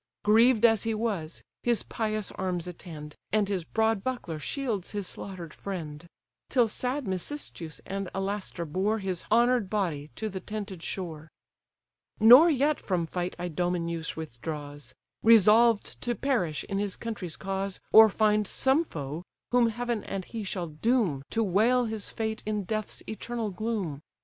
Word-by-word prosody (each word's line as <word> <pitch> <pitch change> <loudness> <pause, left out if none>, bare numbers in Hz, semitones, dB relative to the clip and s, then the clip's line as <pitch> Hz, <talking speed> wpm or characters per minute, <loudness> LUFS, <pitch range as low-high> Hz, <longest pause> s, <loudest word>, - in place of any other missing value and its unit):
Grieved 225 +2 +5
as 225 -3 +5
he 225 -1 -1
was, 200 -8 -3 0.2
his 240 -2 +1
pious 215 -2 -2
arms 180 -3 -2
attend, 160 -4 -9 0.2
And 210 -1 +2
his 195 -4 -1
broad 220 +2 +1
buckler 245 -12 -3
shields 225 - -3
his 205 -2 -2
slaughter'd 180 -3 -7
friend: 170 -5 -6 0.4
Till 245 -3 +4
sad 255 +4 -3
Mecistheus 185 - -4
and 195 -1 -4
Alastor 195 -3 -3
bore 190 +8 0
His 190 -4 -3
honour'd 235 -2 +4
body 170 -9 -1
to 220 - -3
the 190 -3 -4
tented 200 -2 -6
shore. 160 -4 -5 0.9
Nor 250 +10 +9
yet 295 0 +2
from 180 -4 0
fight 175 +2 -3
Idomeneus 175 -1 -2
withdraws; 145 0 -7 0.3
Resolved 225 0 +5
to 240 -1 -1
perish 215 - 0
in 195 - -3
his 200 -2 -1
country's 205 -8 -4
cause, 195 0 -3
Or 220 0 +9
find 210 0 +2
some 270 +5 +2
foe, 150 - -6 0.3
whom 245 -1 +5
heaven 240 -1 -2
and 195 -2 -4
he 225 -2 -5
shall 185 -3 -3
doom 180 - +1
To 225 - +1
wail 225 +6 +3
his 220 -2 -4
fate 220 -1 -3
in 210 -1 -1
death's 215 +2 -4
eternal 225 0 -4
gloom. 190 -8 -3
205 Hz, 150 wpm, -28 LUFS, 175-225 Hz, 0.9 s, Nor